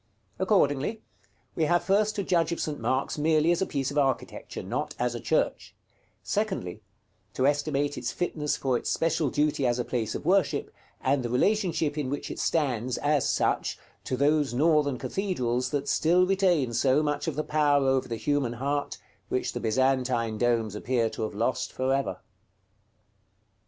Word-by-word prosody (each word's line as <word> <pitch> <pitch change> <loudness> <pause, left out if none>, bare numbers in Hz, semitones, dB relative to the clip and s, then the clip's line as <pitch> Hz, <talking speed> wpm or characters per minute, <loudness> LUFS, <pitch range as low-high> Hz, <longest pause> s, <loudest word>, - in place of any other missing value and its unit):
Accordingly, 185 0 +1 0.5
we 160 - +1
have 175 +2 +2
first 210 +2 +2
to 200 - -1
judge 170 -3 +1
of 170 - -2
St. 150 -2 -3
Mark's 130 +3 -1
merely 155 +1 +3
as 175 - +1
a 190 - +1
piece 135 -1 -2
of 145 - +1
architecture, 135 -3 -2
not - - -3
as 120 0 0
a 120 - -4
church; - - -1 0.5
secondly, - - -2 0.5
to 130 - +1
estimate 145 0 0
its - - -3
fitness 155 -4 -2
for 130 -2 0
its - - -2
special 165 -3 +1
duty 145 +1 0
as 120 0 +1
a 125 - -2
place 115 -4 -2
of - - -6
worship, 185 -2 +1 0.3
and 135 +1 +1
the 120 - -3
relation 195 - +2 0.2
in 145 -3 -3
which 145 +1 -4
it - - -6
stands, 130 -6 0
as 145 -1 +1
such, - - 0 0.3
to 130 - -2
those 145 -1 +2
northern 150 -2 +3
cathedrals 125 - -1
that 145 0 -2
still 175 +5 +3
retain 180 -10 +2
so 130 +5 +3
much 145 +1 -1
of 160 - -1
the 155 - -1
power 145 -3 +2
over 130 -1 +1
the 115 - -3
human 140 -1 0
heart, 140 +4 -2 0.3
which - - -1
the - - -3
Byzantine 125 -2 +1
domes 115 -3 +1
appear 115 +1 0
to - - -6
have 110 -2 -3
lost 115 +5 -1
for 130 +1 0
ever. 135 0 -2
145 Hz, 170 wpm, -27 LUFS, 125-155 Hz, 0.5 s, merely